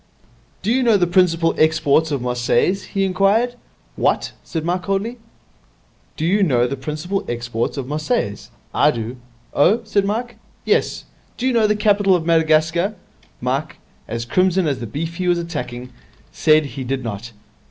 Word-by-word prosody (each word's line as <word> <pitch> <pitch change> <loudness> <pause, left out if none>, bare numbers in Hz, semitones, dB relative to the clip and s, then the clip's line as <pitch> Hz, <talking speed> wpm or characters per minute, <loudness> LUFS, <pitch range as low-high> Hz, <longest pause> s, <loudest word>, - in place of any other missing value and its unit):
'Do 210 - +1
you 260 +2 +3
know 230 -4 +4
the 180 - +3
principal 170 -2 +3
exports 155 0 +3
of 140 -5 -2
Marseilles?' 125 +10 +1
he 195 - -1
inquired. 200 +6 +2 0.4
'What?' - - 0
said 160 -2 -4
Mike 180 +1 0
coldly. 200 +6 -2 1.0
'Do 155 - -1
you 200 +5 +2
know 125 -10 +3
the 130 +3 -2
principal 155 +8 -3
exports 120 +1 -2
of 135 - -3
Marseilles? 150 - -2 0.2
I - - +4
do.' 115 +2 -4 0.4
'Oh?' 205 +11 +4
said 210 -2 +1
Mike. 235 +4 -3 0.3
'Yes. - - +1 0.3
Do 250 - -3
you 260 - +2
know 225 -2 +4
the 210 - +2
capital 205 -2 +3
of 165 -3 -2
Madagascar?' 165 +4 +2 0.5
Mike, - - -2 0.3
as 115 0 -4
crimson 185 +6 +2
as 140 -4 -1
the 115 - -5
beef 165 +8 -4
he 185 -1 -2
was 175 -1 +3
attacking, 125 -7 -5 0.4
said 155 -1 +3
he 135 -1 -6
did 130 +1 -3
not. 115 0 -5
165 Hz, 165 wpm, -20 LUFS, 135-195 Hz, 1.0 s, know